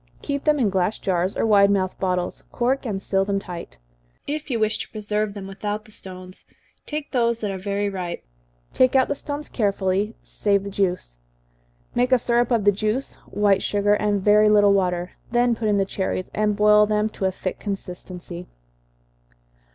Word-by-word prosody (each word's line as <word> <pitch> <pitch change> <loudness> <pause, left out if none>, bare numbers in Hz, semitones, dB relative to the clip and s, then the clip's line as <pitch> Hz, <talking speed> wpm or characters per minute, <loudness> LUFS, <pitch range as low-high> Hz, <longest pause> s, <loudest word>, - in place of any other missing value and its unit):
Keep 280 -1 -3
them 300 -1 +4
in 230 -8 +2
glass 190 +2 +1
jars, 185 0 -1
or - - +1
wide 200 -2 +5
mouthed 190 -2 0
bottles 180 -1 -1
cork 255 +2 0
and 195 -3 -3
seal 195 -1 +1
them 200 0 -1
tight. 175 - -7 0.5
If 300 +1 -4
you 235 -4 0
wish 215 0 +1
to - - -5
preserve 210 -1 -2
them 200 -2 -6
without 205 +2 -4
the 215 - -16
stones, 185 -2 -9 0.4
take 300 -1 -4
those 235 -3 +1
that 210 -2 -1
are 190 - -4
very 200 +1 -1
ripe, 180 -3 -4 0.5
take 255 +1 +3
out 260 -1 +4
the - - +2
stones 290 +1 -6
carefully, 200 -1 0
save 200 -2 0
the 200 - -6
juice. 180 - -1 0.8
Make 250 +1 +1
a 255 - +7
syrup 240 0 +1
of 230 -5 +1
the 205 - +7
juice, 215 +6 -2
white 200 -2 +2
sugar, 205 0 +2
and 210 -2 +1
very 210 +1 +5
little 205 -1 +5
water, 180 -2 0 0.2
then 240 0 +3
put 225 -1 -2
in 205 -1 +3
the 195 - +2
cherries, 190 -1 -3
and 210 -1 +1
boil 210 0 +5
them 210 0 +1
to 200 - -4
a 190 - +2
thick 185 0 -5
consistency. 180 -3 -7
205 Hz, 185 wpm, -23 LUFS, 190-220 Hz, 0.8 s, a